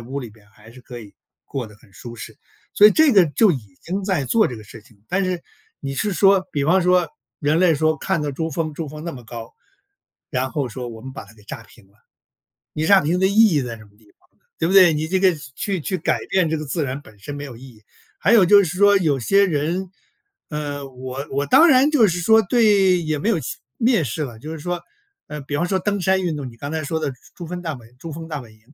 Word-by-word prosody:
屋 135 Hz, +4 st, -5 dB
里 120 Hz, -, -7 dB
边 105 Hz, -1 st, -21 dB
还 110 Hz, +1 st, -18 dB
是 125 Hz, +1 st, -15 dB
可 120 Hz, -1 st, -9 dB
以 105 Hz, -3 st, -14 dB, 0.3 s
过 130 Hz, -4 st, -5 dB
得 105 Hz, -, -15 dB
很 100 Hz, -, -23 dB
舒 120 Hz, +4 st, -10 dB
适。 115 Hz, -, -10 dB, 0.4 s
所 205 Hz, -, +8 dB
以 -, -, +7 dB
这 310 Hz, +2 st, +4 dB
个 190 Hz, -4 st, +7 dB
就 205 Hz, +8 st, +3 dB
已 105 Hz, -, -6 dB
经 190 Hz, +3 st, -4 dB
在 180 Hz, -9 st, -1 dB
做 220 Hz, -, +3 dB
这 125 Hz, -, -6 dB
个 -, -, -11 dB
事 105 Hz, +1 st, -13 dB
情。 110 Hz, -4 st, -24 dB
但 195 Hz, +2 st, 0 dB
是 180 Hz, -2 st, -2 dB, 0.4 s
你 135 Hz, -1 st, -5 dB
是 205 Hz, +7 st, -1 dB
说 195 Hz, +2 st, +3 dB
比 145 Hz, -2 st, -1 dB
方 185 Hz, +2 st, +3 dB
说 180 Hz, -1 st, +3 dB, 0.3 s
人 150 Hz, +2 st, +1 dB
类 175 Hz, -3 st, +4 dB
说 155 Hz, +1 st, +1 dB
看 190 Hz, +2 st, -1 dB
到 150 Hz, -1 st, -2 dB
珠 160 Hz, +4 st, -4 dB
峰 155 Hz, 0 st, -3 dB
珠 160 Hz, -1 st, -5 dB
峰 150 Hz, +2 st, -9 dB
那 170 Hz, -, -3 dB
么 125 Hz, -5 st, -11 dB
高， 115 Hz, 0 st, -9 dB, 0.8 s
然 130 Hz, -2 st, -2 dB
后 140 Hz, -3 st, -2 dB
说 125 Hz, +2 st, -7 dB
我 115 Hz, -2 st, -9 dB
们 130 Hz, +3 st, -8 dB
把 -, -, -8 dB
它 105 Hz, -, -18 dB
给 105 Hz, -2 st, -20 dB
炸 110 Hz, -, -8 dB
平 115 Hz, -3 st, -20 dB
了。 100 Hz, -, -30 dB, 0.8 s
你 155 Hz, -, -2 dB
炸 195 Hz, +2 st, +6 dB
平 170 Hz, +5 st, 0 dB
的 190 Hz, -, +4 dB
意 200 Hz, -, -2 dB, 0.2 s
义 145 Hz, -, +2 dB
在 120 Hz, -2 st, -6 dB
什 110 Hz, -, -15 dB
么 100 Hz, -, -21 dB
地 110 Hz, -1 st, -26 dB
方 -, -, -33 dB
呢， -, -, -43 dB
对 165 Hz, -, 0 dB
不 185 Hz, -, 0 dB
对？ 185 Hz, -4 st, +7 dB
你 155 Hz, +1 st, -2 dB
这 185 Hz, +2 st, 0 dB
个 190 Hz, -2 st, +5 dB, 0.2 s
去 195 Hz, -4 st, -3 dB
去 185 Hz, +5 st, -2 dB
改 -, -, 0 dB
变 180 Hz, -4 st, +2 dB
这 160 Hz, -, -1 dB
个 155 Hz, -, -5 dB
自 155 Hz, +3 st, -3 dB
然 135 Hz, 0 st, -3 dB
本 110 Hz, -7 st, -18 dB
身 145 Hz, +6 st, -7 dB
没 145 Hz, -, -6 dB
有 125 Hz, -5 st, -9 dB
意 125 Hz, -, -15 dB
义。 115 Hz, -5 st, -15 dB, 0.3 s
还 205 Hz, -, +2 dB
有 210 Hz, -5 st, +7 dB
就 200 Hz, +2 st, +6 dB
是 175 Hz, 0 st, -4 dB
说 205 Hz, +1 st, +5 dB
有 145 Hz, -7 st, 0 dB
些 200 Hz, -, +3 dB
人， 175 Hz, +4 st, -2 dB, 0.6 s
呃， 145 Hz, -2 st, -5 dB
我 130 Hz, +2 st, -7 dB
我 140 Hz, +1 st, -1 dB
当 330 Hz, -, +6 dB
然 270 Hz, 0 st, +5 dB
就 240 Hz, -9 st, +4 dB
是 175 Hz, +1 st, -2 dB
说 220 Hz, +5 st, +5 dB
对 195 Hz, -4 st, +3 dB
也 155 Hz, -1 st, -1 dB
没 180 Hz, -, -2 dB
有 220 Hz, -6 st, +2 dB, 0.4 s
蔑 235 Hz, -5 st, +3 dB
视 150 Hz, +3 st, -3 dB
了， 120 Hz, -4 st, -9 dB
就 155 Hz, -, -8 dB
是 160 Hz, -, -6 dB
说， 175 Hz, +2 st, -4 dB, 0.5 s
呃， 150 Hz, 0 st, -6 dB
比 145 Hz, +1 st, -4 dB
方 175 Hz, +4 st, 0 dB
说 190 Hz, -, +1 dB
登 200 Hz, +2 st, -1 dB
山 190 Hz, +1 st, +2 dB
运 165 Hz, -4 st, -2 dB
动， 135 Hz, -3 st, -5 dB
你 115 Hz, -, -17 dB
刚 140 Hz, +4 st, -6 dB
才 160 Hz, -1 st, -2 dB
说 160 Hz, +2 st, -2 dB
的 145 Hz, -, -2 dB
珠 -, -, -16 dB, 0.2 s
珠 175 Hz, -, -7 dB
峰 175 Hz, +1 st, -6 dB
大 160 Hz, -3 st, -3 dB
本 120 Hz, 0 st, -17 dB
珠 165 Hz, +2 st, -8 dB
峰 165 Hz, +1 st, -8 dB
大 150 Hz, -3 st, -4 dB
本 115 Hz, -3 st, -14 dB
营。 110 Hz, -, -23 dB
155 Hz, 285 characters per minute, -21 LUFS, 130-185 Hz, 0.8 s, 所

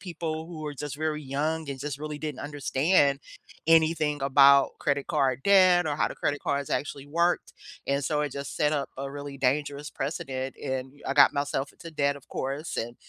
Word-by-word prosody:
people 165 Hz, -3 st, -4 dB
who 165 Hz, -3 st, -8 dB
were 150 Hz, -1 st, -5 dB
just 145 Hz, 0 st, -5 dB
very 155 Hz, 0 st, -2 dB
young 150 Hz, +3 st, -2 dB
and 135 Hz, -1 st, -6 dB
just 145 Hz, -1 st, -4 dB
really 150 Hz, 0 st, -5 dB
didn't 150 Hz, -3 st, -5 dB
understand 145 Hz, 0 st, +2 dB, 0.5 s
anything 160 Hz, -2 st, +3 dB
about 140 Hz, 0 st, +6 dB
credit 140 Hz, -1 st, 0 dB
card 130 Hz, -2 st, +1 dB
debt 185 Hz, -3 st, +5 dB
or 145 Hz, -1 st, -1 dB
how -, -, +2 dB
the -, -, -7 dB
credit 145 Hz, -, -1 dB
cards 140 Hz, -1 st, -1 dB
actually 140 Hz, 0 st, -3 dB
worked 170 Hz, +4 st, 0 dB, 0.3 s
and 140 Hz, 0 st, 0 dB
so 150 Hz, 0 st, 0 dB
it 150 Hz, -1 st, -1 dB
just 140 Hz, 0 st, -6 dB
set 150 Hz, -, +2 dB
up 145 Hz, -2 st, -2 dB
a 135 Hz, 0 st, -4 dB
really 140 Hz, -1 st, -7 dB
dangerous 145 Hz, +2 st, 0 dB
precedent 135 Hz, -2 st, -4 dB
and 130 Hz, -1 st, -3 dB
I 135 Hz, -, -1 dB
got 145 Hz, -, +7 dB
myself 140 Hz, -1 st, -2 dB
into 165 Hz, -, -11 dB
debt 140 Hz, -2 st, +1 dB
of 140 Hz, -, -16 dB
course, 140 Hz, +5 st, -4 dB
and 120 Hz, +1 st, -3 dB
145 Hz, 195 wpm, -27 LUFS, 140-155 Hz, 0.5 s, got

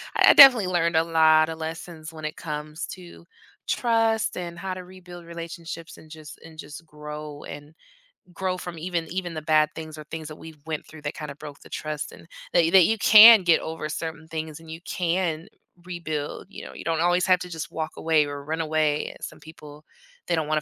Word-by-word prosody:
I -, -, +7 dB
definitely 250 Hz, -8 st, +9 dB
learned 170 Hz, -2 st, +1 dB
a 160 Hz, -, +4 dB
lot 160 Hz, -1 st, +4 dB
of 160 Hz, -, -5 dB
lessons 160 Hz, 0 st, -7 dB
when 155 Hz, -1 st, -8 dB
it 155 Hz, -, -5 dB
comes 150 Hz, 0 st, -5 dB
to 175 Hz, -2 st, -13 dB, 0.4 s
trust 225 Hz, -3 st, +1 dB
and 175 Hz, -1 st, -6 dB
how 190 Hz, 0 st, -4 dB
to 185 Hz, -, -8 dB
rebuild 180 Hz, -1 st, -13 dB
relationships 165 Hz, 0 st, -8 dB
and 155 Hz, -, -16 dB
just 155 Hz, -1 st, -11 dB
and 160 Hz, -1 st, -14 dB
just 150 Hz, +3 st, -9 dB
grow 150 Hz, -1 st, -9 dB
and 145 Hz, +1 st, -10 dB, 0.6 s
grow 185 Hz, 0 st, -2 dB
from 175 Hz, -2 st, -7 dB
even 170 Hz, 0 st, -3 dB
even 180 Hz, -1 st, -4 dB
the 155 Hz, -, -5 dB
bad 155 Hz, 0 st, +3 dB
things 155 Hz, -1 st, -8 dB
or 155 Hz, -, -8 dB
things 160 Hz, -1 st, -6 dB
that 155 Hz, -, -8 dB
we've 160 Hz, -1 st, -13 dB
went 155 Hz, -2 st, -4 dB
through 155 Hz, -1 st, -13 dB
that 145 Hz, +1 st, -5 dB
kind 150 Hz, -2 st, -6 dB
of 140 Hz, -, -13 dB
broke 145 Hz, -2 st, -10 dB
the -, -, -15 dB
trust 155 Hz, -1 st, -4 dB
and -, -, -15 dB, 0.3 s
that 165 Hz, -1 st, +3 dB
that 185 Hz, -2 st, +7 dB
you 225 Hz, +4 st, +1 dB
can 220 Hz, +1 st, +10 dB
get 170 Hz, -2 st, +4 dB
over 160 Hz, -1 st, -5 dB
certain 160 Hz, 0 st, -5 dB
things 160 Hz, -1 st, -6 dB
and 165 Hz, -1 st, -15 dB
you 160 Hz, +1 st, -7 dB
can 175 Hz, -2 st, -2 dB, 0.4 s
rebuild. 155 Hz, -5 st, -5 dB
You -, -, -9 dB
know, -, -, -10 dB
you -, -, -9 dB
don't 165 Hz, -1 st, -1 dB
always 175 Hz, +1 st, +2 dB
have 185 Hz, -1 st, +4 dB
to 180 Hz, 0 st, -7 dB
just 160 Hz, -2 st, -6 dB
walk 160 Hz, -1 st, -4 dB
away 160 Hz, -2 st, +2 dB
or 145 Hz, 0 st, -7 dB
run 160 Hz, +2 st, -2 dB
away. 155 Hz, -1 st, 0 dB
Yeah, -, -, -9 dB
some -, -, -8 dB
people, 150 Hz, -2 st, -13 dB, 0.4 s
they 175 Hz, -, +1 dB
don't 160 Hz, -2 st, -2 dB
wanna 155 Hz, 0 st, 0 dB
160 Hz, 215 wpm, -25 LUFS, 155-175 Hz, 0.6 s, can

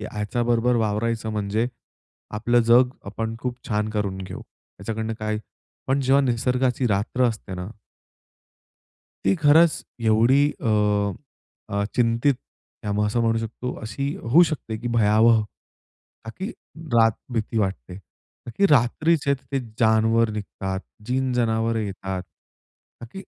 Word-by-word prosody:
हे 105 Hz, -, -5 dB
ह्याच्या 105 Hz, +3 st, -2 dB
बरोबर 120 Hz, +1 st, +2 dB
वावरायचं 110 Hz, +1 st, -1 dB
म्हणजे 105 Hz, +2 st, -1 dB, 0.7 s
आपलं 120 Hz, +2 st, +3 dB
जग 125 Hz, +1 st, +7 dB, 0.2 s
आपण 110 Hz, +2 st, -4 dB
खूप 125 Hz, -1 st, -4 dB
छान 105 Hz, -1 st, 0 dB
करून 100 Hz, -3 st, -2 dB
घेऊ 95 Hz, -, -7 dB
ह्याच्याकडनं 110 Hz, 0 st, -7 dB
काय 110 Hz, 0 st, -1 dB, 0.5 s
पण 135 Hz, +1 st, +1 dB
जेव्हा 135 Hz, +1 st, +4 dB
निसर्गाची 125 Hz, +1 st, +1 dB
रात्र 110 Hz, +5 st, 0 dB
असते 105 Hz, -4 st, -6 dB
ना? 90 Hz, 0 st, -5 dB, 1.6 s
ती -, -, +4 dB
खरंच 155 Hz, +3 st, +6 dB, 0.3 s
एवढी, 115 Hz, +6 st, +4 dB, 0.2 s
अ, 130 Hz, -, -4 dB, 1.0 s
अ, 100 Hz, 0 st, 0 dB
चिंतित 120 Hz, +3 st, +2 dB
किंवा 105 Hz, -4 st, -10 dB
मग 105 Hz, 0 st, +2 dB
असं 115 Hz, +3 st, 0 dB
म्हणू 115 Hz, -1 st, +2 dB
शकतो, 115 Hz, +3 st, -5 dB
अशी 140 Hz, +6 st, -3 dB
होऊ 140 Hz, +10 st, +5 dB
शकते, 115 Hz, -8 st, -4 dB
की 120 Hz, +2 st, -4 dB
भयावह, 110 Hz, +1 st, +5 dB, 0.8 s
का 115 Hz, -, -6 dB
की 190 Hz, +3 st, -3 dB, 0.5 s
रात 115 Hz, -1 st, +5 dB, 0.2 s
भीती 110 Hz, 0 st, -1 dB
वाटते. 95 Hz, -, -2 dB
का 100 Hz, +5 st, -16 dB
की 200 Hz, -, +5 dB
रात्रीचे 140 Hz, +4 st, +3 dB
ते 135 Hz, 0 st, -4 dB, 0.2 s
जानवर 110 Hz, +1 st, +3 dB
निघतात, 95 Hz, -2 st, -4 dB, 0.3 s
जीन-जनावरं 120 Hz, -3 st, 0 dB
येतात 95 Hz, -2 st, -4 dB
ना, -, -, -26 dB, 0.8 s
का -, -, -10 dB
की 195 Hz, -, -7 dB
115 Hz, 135 wpm, -24 LUFS, 105-125 Hz, 1.6 s, जग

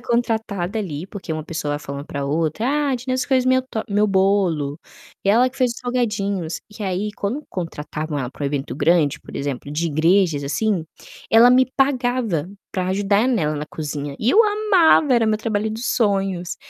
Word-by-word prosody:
contratada 220 Hz, -4 st, -1 dB
ali, 170 Hz, -4 st, -4 dB
porque 195 Hz, -3 st, -9 dB
uma 155 Hz, -1 st, -3 dB
pessoa 160 Hz, -3 st, -3 dB
vai 145 Hz, -, -2 dB
falando 140 Hz, 0 st, -7 dB
pra 140 Hz, -1 st, -4 dB
outra: 160 Hz, -, -1 dB
"Ah, 290 Hz, 0 st, +1 dB
a -, -, +2 dB
Dineusa 255 Hz, +1 st, -2 dB
fez 260 Hz, -2 st, +3 dB
meu 260 Hz, 0 st, +4 dB
to 220 Hz, -, -3 dB
meu 205 Hz, +1 st, +3 dB
bolo 190 Hz, -7 st, +1 dB, 0.4 s
e -, -, -1 dB
ela 245 Hz, +5 st, +4 dB
que 265 Hz, -, -18 dB
fez 250 Hz, -2 st, +2 dB
os -, -, -10 dB
salgadinhos". 205 Hz, -9 st, -2 dB, 0.2 s
E 215 Hz, -, -5 dB
aí 195 Hz, +2 st, -2 dB
quando 245 Hz, +11 st, -3 dB
contratavam 155 Hz, -3 st, -4 dB
ela 125 Hz, -3 st, -3 dB
para 145 Hz, -, -10 dB
um -, -, +1 dB
evento 140 Hz, -2 st, -3 dB
grande, 150 Hz, -1 st, +2 dB
por -, -, -10 dB
exemplo, 140 Hz, 0 st, -4 dB
de 165 Hz, +3 st, -1 dB
igrejas 165 Hz, 0 st, +2 dB
assim, 175 Hz, +5 st, 0 dB, 0.5 s
ela 230 Hz, +2 st, +7 dB
me 255 Hz, +1 st, +5 dB
pagava 245 Hz, -, +1 dB, 0.2 s
pra 185 Hz, -1 st, -1 dB
ajudar 200 Hz, +4 st, +2 dB
nela 160 Hz, -12 st, +1 dB
na 150 Hz, -, -4 dB
cozinha, 145 Hz, -2 st, -5 dB
e 225 Hz, -, +1 dB
eu 435 Hz, -, +6 dB
amava, 395 Hz, -9 st, +4 dB
era 235 Hz, -2 st, +3 dB
meu 215 Hz, 0 st, +2 dB
trabalho 220 Hz, -1 st, -1 dB
dos 225 Hz, +3 st, -4 dB
sonhos. 195 Hz, -5 st, 0 dB
200 Hz, 190 wpm, -21 LUFS, 155-240 Hz, 0.5 s, ela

